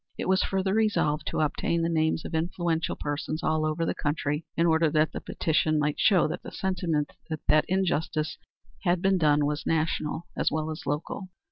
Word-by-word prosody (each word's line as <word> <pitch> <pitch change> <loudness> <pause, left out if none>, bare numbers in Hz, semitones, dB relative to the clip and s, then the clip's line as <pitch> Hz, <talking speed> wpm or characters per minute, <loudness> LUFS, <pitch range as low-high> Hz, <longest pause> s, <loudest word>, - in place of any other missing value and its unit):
It - - -3
was 190 0 +3
further 190 0 0
resolved 180 -9 +1
to - - -1
obtain 165 +2 0
the - - +2
names 160 -1 +1
of - - -6
influential 165 0 -1
persons 150 +2 -3
all 155 0 +1
over 160 +2 -1
the - - 0
country 150 +1 -2
in 165 - +3
order 160 -1 +4
that 155 +1 +2
the - - -5
petition 155 -1 +1
might 150 0 0
show 190 -5 +4
that 155 - -4
the - - -8
sentiment 170 -6 -1 0.4
that 155 - +5
injustice 170 -3 0 0.5
had 175 -2 +1
been 190 -1 +3
done 150 -2 +3
was 150 +1 -2
national 160 0 0
as - - +1
well 155 0 -2
as 155 - -7
local. 150 +6 -3
160 Hz, 190 wpm, -27 LUFS, 155-175 Hz, 0.5 s, that